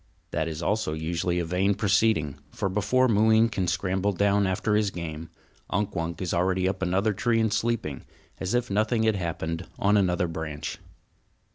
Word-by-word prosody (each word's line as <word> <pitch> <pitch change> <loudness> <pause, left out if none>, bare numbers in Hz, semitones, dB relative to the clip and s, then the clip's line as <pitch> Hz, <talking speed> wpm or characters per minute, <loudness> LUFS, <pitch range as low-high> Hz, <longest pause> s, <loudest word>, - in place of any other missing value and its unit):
That 80 +2 -1
also 105 -6 0
is 80 - -6
usually 85 +1 -1
a 85 - 0
vain 95 +4 +1
proceeding; 95 -8 +1
for 100 - -2
before 105 +7 +2
Mooween 110 +1 +4
can 95 -5 -2
scramble 95 +3 0
down 100 +1 +2
after 105 +3 0
his 105 -1 +2
game, 80 -3 -6 0.4
Unk 105 +1 -1
Wunk 85 0 -3
is 90 - -2
already 90 +1 +1
up 95 0 -2
another 95 +4 +1
tree 115 +3 +1
and 110 -2 +1
sleeping, 110 - -2 0.3
as 95 +5 -1
if 120 -3 0
nothing 110 +3 +1
had 110 -1 +3
happened, 85 -1 -3
on 105 +1 +3
another 90 -3 +2
branch. 80 -2 -5
95 Hz, 170 wpm, -26 LUFS, 85-105 Hz, 0.4 s, Mooween